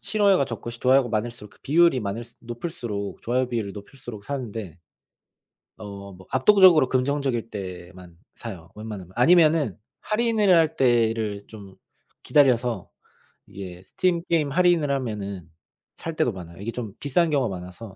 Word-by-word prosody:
싫어요가 200 Hz, -8 st, +3 dB
적고 125 Hz, -3 st, -6 dB
좋아요가 125 Hz, +2 st, +3 dB
많을수록 110 Hz, -1 st, -3 dB
그 -, -, -22 dB
비율이 165 Hz, -2 st, +4 dB
많을수 115 Hz, +3 st, -5 dB
높을수록 120 Hz, -5 st, -5 dB
좋아요 125 Hz, +2 st, 0 dB
비율이 115 Hz, -5 st, -3 dB
높을수록 110 Hz, 0 st, -10 dB
사는데. 110 Hz, -, -5 dB, 1.0 s
어 100 Hz, -1 st, -9 dB
뭐 95 Hz, 0 st, -15 dB
압도적으로 170 Hz, -, +6 dB
긍정적일 130 Hz, -3 st, 0 dB
때만 90 Hz, -3 st, -8 dB, 0.2 s
사요, 90 Hz, -8 st, -9 dB
웬만하면. 105 Hz, -4 st, -8 dB
아니면은 155 Hz, -, +4 dB, 0.3 s
할인을 215 Hz, -3 st, +2 dB
할 160 Hz, -1 st, +4 dB
때를 115 Hz, -5 st, +1 dB
좀 100 Hz, -3 st, -12 dB, 0.5 s
기다려서 125 Hz, -7 st, +2 dB, 0.6 s
이게 90 Hz, -2 st, -9 dB
스팀 175 Hz, -, 0 dB
게임 155 Hz, -4 st, +1 dB
할인을 175 Hz, -2 st, +3 dB
하면은 105 Hz, -, -4 dB, 0.5 s
살 165 Hz, -1 st, -6 dB
때도 120 Hz, -, +1 dB
많아요. 85 Hz, -3 st, -10 dB
이게 115 Hz, +3 st, -3 dB
좀 115 Hz, -4 st, -6 dB
비싼 165 Hz, +4 st, +1 dB
경우가 130 Hz, -10 st, 0 dB
많아서 95 Hz, +3 st, -10 dB
120 Hz, 335 characters per minute, -24 LUFS, 100-145 Hz, 1.0 s, 압도적으로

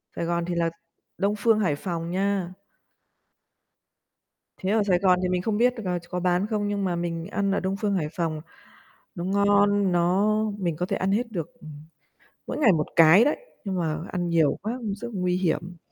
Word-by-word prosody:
Sài 170 Hz, -, -2 dB
Gòn 170 Hz, 0 st, -1 dB
thì 175 Hz, -1 st, -3 dB
là 170 Hz, -1 st, +1 dB, 0.5 s
Đông 200 Hz, +1 st, +1 dB
Phương, 220 Hz, 0 st, +3 dB
Hải 175 Hz, -8 st, +1 dB
Phòng 170 Hz, +1 st, -4 dB
nha. 190 Hz, -1 st, -1 dB, 2.0 s
Thế 190 Hz, -, -3 dB
ở 215 Hz, -1 st, +3 dB
Sài 180 Hz, -3 st, +2 dB
Gòn 185 Hz, -2 st, +3 dB
thì 180 Hz, -, 0 dB
mình 180 Hz, -1 st, 0 dB
không 210 Hz, +2 st, -1 dB
biết 245 Hz, +2 st, +3 dB
được, 225 Hz, -, -6 dB
à, 180 Hz, -1 st, -1 dB
ch 175 Hz, -, -19 dB
có 180 Hz, -, -2 dB
bán 180 Hz, +2 st, +1 dB
không? 210 Hz, -2 st, -1 dB
Nhưng 200 Hz, -1 st, -1 dB
mà 175 Hz, -2 st, 0 dB
mình 170 Hz, 0 st, -3 dB
ăn 200 Hz, -1 st, -1 dB
ở 200 Hz, -, +1 dB
Đông 190 Hz, +1 st, -2 dB
Phương, 205 Hz, -1 st, +1 dB
Hải 155 Hz, -5 st, -1 dB
Phòng 165 Hz, -4 st, -2 dB, 0.7 s
nó 170 Hz, -, -4 dB
ngon, 200 Hz, 0 st, +3 dB
nó 185 Hz, +5 st, +2 dB, 0.2 s
mình 170 Hz, -4 st, -1 dB
có 175 Hz, +3 st, -2 dB
thể 195 Hz, -, -2 dB
ăn 190 Hz, +1 st, 0 dB
hết 230 Hz, +2 st, 0 dB
được, 170 Hz, -6 st, -5 dB
ừm, 155 Hz, -, -10 dB, 0.8 s
mỗi -, -, -3 dB
ngày 235 Hz, -9 st, +5 dB
1 150 Hz, -2 st, 0 dB
cái 165 Hz, +7 st, +7 dB
đấy, 295 Hz, -, +1 dB, 0.3 s
nhưng 195 Hz, -, -2 dB
mà 155 Hz, -2 st, -1 dB
ăn 175 Hz, -1 st, -2 dB
nhiều 160 Hz, -4 st, +2 dB
quá 220 Hz, +4 st, -3 dB
cũng 210 Hz, -3 st, -3 dB
rất 240 Hz, +3 st, -7 dB
nguy 180 Hz, -2 st, 0 dB
hiểm. 175 Hz, 0 st, -2 dB
185 Hz, 210 wpm, -25 LUFS, 170-205 Hz, 2.0 s, cái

